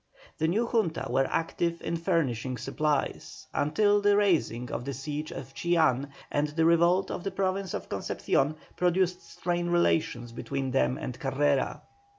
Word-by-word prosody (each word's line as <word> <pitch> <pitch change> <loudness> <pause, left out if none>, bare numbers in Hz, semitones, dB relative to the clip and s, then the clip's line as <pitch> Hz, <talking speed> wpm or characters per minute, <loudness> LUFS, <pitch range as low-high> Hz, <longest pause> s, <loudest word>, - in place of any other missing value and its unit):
The 160 - +2
new 215 +8 +1
Junta 220 -9 0
were 135 0 +2
active 170 +1 -1
in 170 - -1
furnishing 135 - 0
supplies 150 +2 -2
until 205 +7 +3
the 205 0 +4
raising 160 - +1
of - - -3
the 140 +1 -4
siege 150 +3 -4
of 135 0 -8
Chillán 155 -6 +2 0.2
and 145 +1 +1
the 160 +2 0
revolt 170 +3 +4
of - - -4
the 195 - -1
province 190 0 -1
of - - -5
Concepcion 145 +3 0 0.2
produced 180 0 +1
strained 175 0 -2
relations 155 -8 +1
between 135 +3 -3
them 135 0 +2
and 125 -6 -6
Carrera. 140 0 0
160 Hz, 155 wpm, -28 LUFS, 135-180 Hz, 0.2 s, the